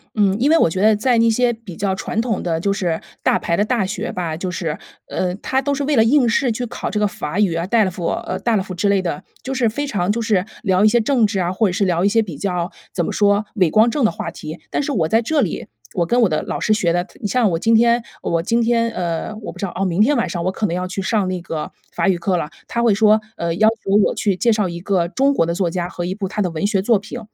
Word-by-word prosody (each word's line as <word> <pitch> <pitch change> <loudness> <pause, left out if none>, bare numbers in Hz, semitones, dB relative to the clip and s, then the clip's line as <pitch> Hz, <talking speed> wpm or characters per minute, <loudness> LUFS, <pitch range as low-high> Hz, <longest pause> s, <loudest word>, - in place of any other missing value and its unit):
嗯， 200 -3 +3
因 270 +5 +3
为 330 - +6
我 170 - +4
觉 185 +3 -2
得 215 +1 +5
在 240 +3 +2
那 230 0 +4
些 240 +2 +2
比 225 -6 -11
较 195 -1 0
传 215 - -3
统 230 -4 -2
的 165 -2 -1
就 200 +4 0
是 175 -5 -2 0.2
大 - - +3
牌 170 - -1
的 205 - +2
大 220 -2 0
学 210 +4 -4
吧， 170 -3 -3
就 180 +3 -4
是， 165 -3 -3 0.3
呃， 180 -1 -2
它 260 +6 -1
都 285 +1 -1
是 280 0 -2
为 295 +1 +1
了 225 - +5
应 250 +2 +4
试 240 +2 +2
去 245 +2 -3
考 230 - -5
这 210 - -2
个 210 - +2
法 180 -1 -4
语 200 -5 +3
啊 165 +1 -1
，DELF 190 -4 +1
呃 185 - -3
，DELF 195 -5 0
之 200 +3 +1
类 200 -1 +3
的。 185 +1 -4 0.2
就 265 - -4
是 255 -3 +1
非 285 +6 -3
常 200 -6 0
就 235 +2 -1
是， 210 -4 +1 0.2
聊 190 -2 +2
一 215 - +7
些 240 +3 +4
政 235 0 +2
治 200 -2 -1
啊， 175 -1 0
或 210 +3 +1
者 - - -1
是 195 +3 0
聊 175 -1 +1
一 200 - +4
些 225 +2 +3
比 175 -10 -6
较， 180 -3 -2 0.2
怎 175 - -1
么 - - -2
说， 205 0 +2
伟 185 -6 +3
光 220 +2 +5
正 285 +3 -1
的 - - +3
话 165 - -5
题。 160 -1 -8
但 - - -1
是 285 - -2
我 170 - +1
在 225 +7 +3
这 295 +5 +1
里， 185 - -2 0.3
我 175 - +1
跟 240 +8 +2
我 225 - +4
的 155 -1 -1
老 - - -4
师 215 - +2
学 175 -5 +1
的， 175 0 +1
它 190 - -19
你 210 - -1
像 235 0 +2
我 165 - 0
今 225 +7 +2
天 235 +1 +4 0.2
我 165 -1 -1
今 230 +6 +1
天， 230 0 +2
呃， 175 +1 -3
我 210 - -6
不 - - -14
知 200 - -2
道 185 - -5
哦， 195 - 0
明 180 +1 +1
天 280 +7 +4
晚 235 - 0
上 175 -3 -3
我 185 - 0
可 210 - -2
能 170 - -2
要 180 0 -2
去 190 +2 -4
上 200 0 0
那 185 -1 -3
个 160 -2 -5 0.2
法 - - +1
语 185 - +2
课 180 +1 0
了， 150 - -3 0.2
他 235 - -1
会 230 -3 +4
说， 215 +1 +4 0.2
呃， 170 -1 -2
要 215 +4 +4
求 225 -3 -5
我 - - +1
去 200 -3 0
介 235 +6 +2
绍 210 -3 +1
一 170 0 -6
个 185 -3 +1
中 270 +10 +2
国 165 - +2
的 170 - -1
作 180 -2 0
家 175 0 -2
和 175 -1 -5
一 180 - -2
部 195 -1 -4
他 210 +2 -3
的 180 -3 0
文 165 +4 -1
学 200 -3 +1
作 215 +1 +3
品。 215 +4 -8
200 Hz, 330 characters per minute, -20 LUFS, 180-230 Hz, 0.3 s, 一